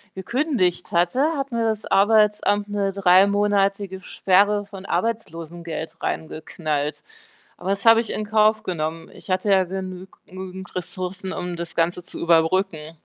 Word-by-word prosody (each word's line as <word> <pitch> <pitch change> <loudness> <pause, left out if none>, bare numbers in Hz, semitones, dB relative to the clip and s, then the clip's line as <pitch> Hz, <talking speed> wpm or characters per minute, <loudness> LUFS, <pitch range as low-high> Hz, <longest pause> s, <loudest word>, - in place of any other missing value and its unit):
gekündigt 200 - -1
hatte, 255 - +2
hat 275 -1 -3
mir 230 -1 0
das 220 -1 -1
Arbeitsamt 205 0 +3
'ne 200 -1 -1
drei-monatige 195 0 +3
Sperre 205 +3 +2
von 195 -1 -11
Arbeitslosengeld 170 -8 -4
reingeknallt. 155 -2 -3 0.5
Aber 185 - -5
das 200 +2 -1
habe 225 0 +8
ich 230 - -8
in 215 - -3
Kauf 215 +1 +3
genommen. 165 -2 -4
Ich - - -14
hatte 185 +2 0
ja 190 -1 +5
genügend 185 0 -6 0.2
genüg - - -21 0.2
nügend 185 -1 -10
Ressourcen, 185 +2 -4
um 175 -1 -4
das 170 0 -6
Ganze 175 +1 0
zu - - -7
überbrücken. 165 -1 +1
190 Hz, 145 wpm, -23 LUFS, 175-205 Hz, 0.5 s, habe